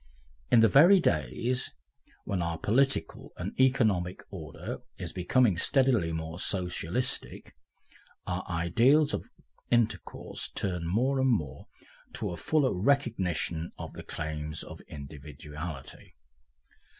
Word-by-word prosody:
In 120 -2 +6
the 115 - +7
very 170 - +7
days 115 - 0 0.5
when 95 -3 -2
our 85 -1 -2
political 135 +10 0
and - - -4
economic 105 -9 +2
order 80 -6 -6 0.2
is - - -6
becoming 95 +2 +3
steadily 120 -6 +3
more 80 +1 -4
Socialistic, 95 +6 -2 0.7
our 90 +1 -2
ideals 120 - +3
of - - -4 0.4
intercourse 120 -2 -1
turn 90 -4 -3
more 130 +9 +1
and 130 0 +3
more 75 - -1 0.5
to - - -3
a - - -4
fuller 145 - +2
recognition 95 - 0
of - - -7
the - - -8
claims 75 0 -5
of - - -10
individuality. 75 +1 -8
90 Hz, 115 wpm, -29 LUFS, 80-125 Hz, 0.7 s, the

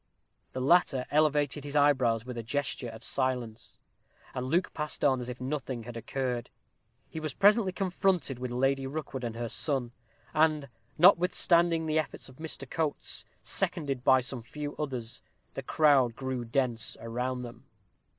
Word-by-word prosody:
The 130 - -3
latter 135 -3 +3
elevated 150 -2 +2
his 145 0 -6
eyebrows 130 -6 +3
with 125 -1 -6
a 115 - -3
gesture 130 +1 -2
of 110 0 -10
silence, 125 -4 -2 0.6
and 125 0 -3
Luke 175 +7 +1
passed 150 -1 -2
on 130 -3 +3
as 125 - -5
if 125 - -6
nothing 130 -2 -3
had 120 +1 -8
occurred. 125 0 -3 0.6
He 160 - -6
was 155 -4 -4
presently 205 0 +5
confronted 180 - 0
with 125 0 -3
Lady 135 +2 +1
Rookwood 135 -2 -5
and 115 -1 -3
her 120 0 -3
son; 130 -1 -2 0.4
and, 155 -2 +2 0.3
notwithstanding 170 -2 +5
the 155 0 +2
efforts 155 - -4
of 130 - -16
Mr. 160 0 -4
Coates, 160 -4 -1 0.2
seconded 135 -4 -2
by 130 0 +6
some 125 -1 -3
few 145 +5 -6
others, 125 -6 -4 0.3
the - - -4
crowd 140 -6 +4
grew 130 -2 -3
dense 120 -2 0
around 125 +2 -3
them. 120 -1 -10
135 Hz, 155 wpm, -30 LUFS, 125-155 Hz, 0.6 s, by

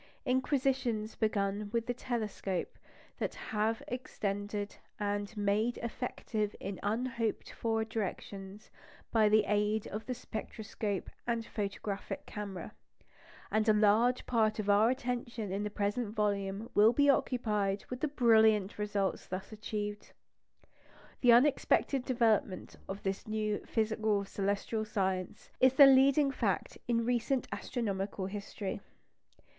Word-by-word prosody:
Inquisitions 255 -4 0
begun 205 -1 -1
with 230 0 0
the 245 - -1
telescope 215 -7 -3 0.4
have 220 +1 -2
been - - -6
extended 205 -4 -3 0.2
and 205 +1 -2
made 210 +4 +1
effective 220 -3 -3
in 195 -1 -5
unhoped 230 +1 -1
for 225 -1 -1
directions 200 -2 -5 0.4
by 220 -2 +4
the 215 0 +5
aid 210 +1 +1
of 215 +2 -6
the 255 - -2
spectroscope 215 -4 -4 0.2
and 230 -1 0
photographic 200 -1 -4
camera; 200 -3 -6 0.8
and 215 +1 +2
a - - +7
large 220 +4 +4
part 220 -3 +2
of 205 -2 +1
our 210 +3 +5
attention 240 -4 -3
in 195 +2 -1
the 210 - -2
present 205 +2 -2
volume 205 0 -1
will 215 +3 +6
be 285 +3 +4
occupied 210 -7 +1
with 250 - -3
the 305 - +1
brilliant 220 -7 +4
results 205 -2 -1
thus 190 +3 -5
achieved. 210 -1 -5 1.1
The 245 - +6
unexpected 270 +1 +4
development 225 -6 +1
of 195 +1 -5
this 195 +1 -3
new 215 -1 -1
physical 220 -2 +1
celestial 200 +3 -1
science 190 -4 -2
is 260 0 +6
the 280 - +10
leading 275 +1 +6
fact 215 -8 -1
in 230 -1 +1
recent 245 +2 0
astronomical 200 -5 -3
history. 200 0 -5
215 Hz, 125 wpm, -32 LUFS, 205-235 Hz, 1.1 s, the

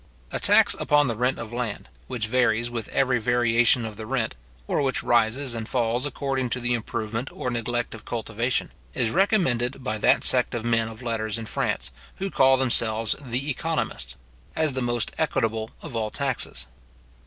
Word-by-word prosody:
A - - -2
tax - - +6
upon 145 -1 +3
the 115 - -1
rent 125 +3 +1
of 115 0 -7
land, 120 -4 -4 0.2
which 120 -4 -2
varies 120 0 +1
with 115 -3 -5
every 130 -2 +2
variation 120 0 +3
of 110 -2 -7
the 110 -1 -7
rent, 125 -3 -1 0.3
or 145 - 0
which 135 -3 0
rises 120 +3 +2
and 115 -1 -5
falls 120 +2 0
according 135 -2 -2
to 125 - -1
the 120 0 -1
improvement 115 +1 -3
or 125 - -4
neglect 120 0 -2
of 115 - -10
cultivation, 115 +2 -2 0.2
is 120 -4 +1
recommended 135 - +1
by 110 -4 -2
that - - +4
sect 125 -1 +6
of 115 -1 -4
men 115 -1 +2
of 110 +2 -10
letters 110 -2 -2
in 115 - -5
France, 110 - -2 0.2
who 195 0 -4
call 135 0 +5
themselves 115 -4 +2
the 135 +2 -2
economists, 130 - -3 0.4
as 155 -3 +1
the 130 - -2
most 120 -2 -1
equitable 115 -7 0
of 150 -7 -7
all 110 -1 -1
taxes. 135 +1 -2
120 Hz, 175 wpm, -25 LUFS, 115-130 Hz, 0.4 s, tax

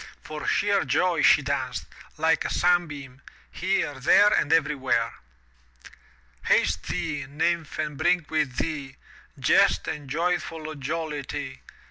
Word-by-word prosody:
For 155 -1 -7
sheer 205 -1 +2
joy 180 -2 +1
she - - +5
danced, - - -2 0.3
like 165 0 +2
a - - -3
sunbeam, 150 -7 0 0.3
here, 180 -7 -1
there 205 +10 +6
and 150 - +1
everywhere. 135 -7 +1 1.3
Haste 80 +3 +2
thee, 145 -3 -3
Nymph 160 +2 -1
and 150 -2 -3
bring 175 +1 +2
with 150 -5 -1
thee/" 140 -4 -3 0.4
Jest - - +3
and 145 -3 -5
youthful 165 -1 -2
Jollity. 145 -2 -5
155 Hz, 115 wpm, -25 LUFS, 140-165 Hz, 1.3 s, there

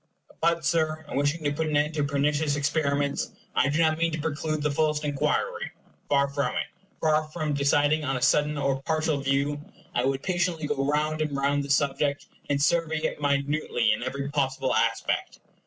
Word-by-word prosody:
But, 170 0 +2
Sir, 160 -1 0
in - - -6
wishing 145 +4 0
to 145 - +1
put 160 +2 -1
an 150 -1 +1
end 150 +2 +1
to 150 -2 0
pernicious 145 +1 +1
experiments, 145 -1 0 0.2
I 145 - +3
do 145 - 0
not 160 -1 +3
mean 165 0 +2
to 155 - -2
preclude 155 0 -2
the 150 - +1
fullest 150 0 0
inquiry. 150 - -1 0.4
Far 140 -1 +3
from 140 -2 -2
it. - - 0 0.3
Far 155 0 +2
from 155 -1 -3
deciding 145 +2 +2
on 135 -2 -1
a - - -5
sudden 150 0 +3
or 135 -1 0
partial 155 0 0
view, 140 +2 0 0.3
I 120 - +1
would 135 0 -1
patiently 175 -4 0
go 145 -1 -1
round 155 +1 0
and 150 -2 -1
round 140 +1 +1
the 140 - -7
subject, 140 +1 +1 0.2
and 140 -1 +1
survey 160 +2 +2
it - - -2
minutely 140 -5 +1
in 105 - -3
every 135 +2 -3
possible 135 -2 0
aspect. - - 0
145 Hz, 190 wpm, -26 LUFS, 140-155 Hz, 0.4 s, I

